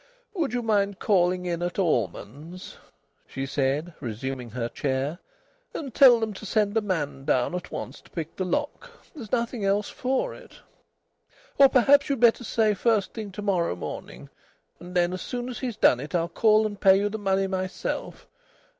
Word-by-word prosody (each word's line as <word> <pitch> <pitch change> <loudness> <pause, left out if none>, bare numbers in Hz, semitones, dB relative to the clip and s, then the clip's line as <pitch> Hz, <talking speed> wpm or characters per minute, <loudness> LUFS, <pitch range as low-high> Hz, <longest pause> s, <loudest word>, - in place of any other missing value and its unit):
"Would 330 -8 -1
you 245 0 -2
mind 200 -3 +1
calling 180 -3 +2
in 175 -1 -2
at 175 0 -3
Allman's," 150 - -3 0.5
she 135 - -4
said, 140 +4 -1
resuming 125 +1 -5
her 115 +1 -3
chair, 135 +6 -2 0.6
"and 275 -7 -5
tell 250 -4 +7
them 220 -1 -2
to 195 - -11
send 210 0 0
a 225 - +3
man 160 -9 -3
down 130 +2 +1
at 180 0 -5
once - - -6
to - - -21
pick 165 -2 -6
the 190 - -2
lock? 295 - -3 0.2
There's 240 - -10
nothing 235 -2 -1
else 200 +1 +1
for 265 - -1
it. - - -14 1.1
Or 275 -1 +8
perhaps 280 +3 +4
you'd 275 -3 0
better 240 +1 +4
say 220 -1 +2
first 210 0 +1
thing 215 -3 -6
to 210 - -6
morrow 180 - +1
morning. 90 - -8 0.5
And 180 +1 -10
then 175 0 +2
as 185 - -5
soon 245 0 -4
as 250 - -6
he's 245 -5 -4
done 125 - +4
it 150 +6 -5
I'll 170 -1 +1
call 215 0 +3
and 205 -2 -5
pay 190 0 +6
you 200 +1 +1
the 220 +1 -4
money 195 -1 +1
myself. 185 0 -4
195 Hz, 180 wpm, -26 LUFS, 165-225 Hz, 1.1 s, Or